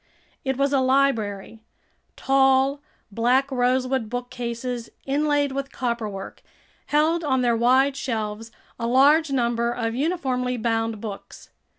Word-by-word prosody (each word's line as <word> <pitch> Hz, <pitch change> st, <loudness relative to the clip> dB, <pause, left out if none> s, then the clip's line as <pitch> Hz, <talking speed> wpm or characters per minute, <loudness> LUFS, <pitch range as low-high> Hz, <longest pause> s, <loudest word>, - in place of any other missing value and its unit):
It 265 Hz, -1 st, -1 dB
was 280 Hz, +1 st, +1 dB
a 275 Hz, -, +4 dB
library. 230 Hz, -6 st, 0 dB, 0.6 s
Tall, 270 Hz, +1 st, +2 dB, 0.3 s
black 250 Hz, +6 st, +1 dB
rosewood 255 Hz, -1 st, 0 dB
bookcases, 245 Hz, 0 st, -5 dB, 0.2 s
inlaid 290 Hz, 0 st, +1 dB
with 275 Hz, 0 st, -4 dB
copperwork, 225 Hz, -6 st, -4 dB, 0.5 s
held 315 Hz, +3 st, +2 dB
on 260 Hz, -4 st, +1 dB
their 240 Hz, -1 st, +2 dB
wide 260 Hz, +4 st, +3 dB
shelves 225 Hz, -3 st, -4 dB, 0.3 s
a 230 Hz, -, -2 dB
large 285 Hz, +6 st, +4 dB
number 235 Hz, -3 st, 0 dB
of 225 Hz, -1 st, -2 dB
uniformly 255 Hz, -4 st, -1 dB
bound 225 Hz, -1 st, -1 dB
books. 205 Hz, -3 st, -9 dB
255 Hz, 115 wpm, -24 LUFS, 230-275 Hz, 0.6 s, a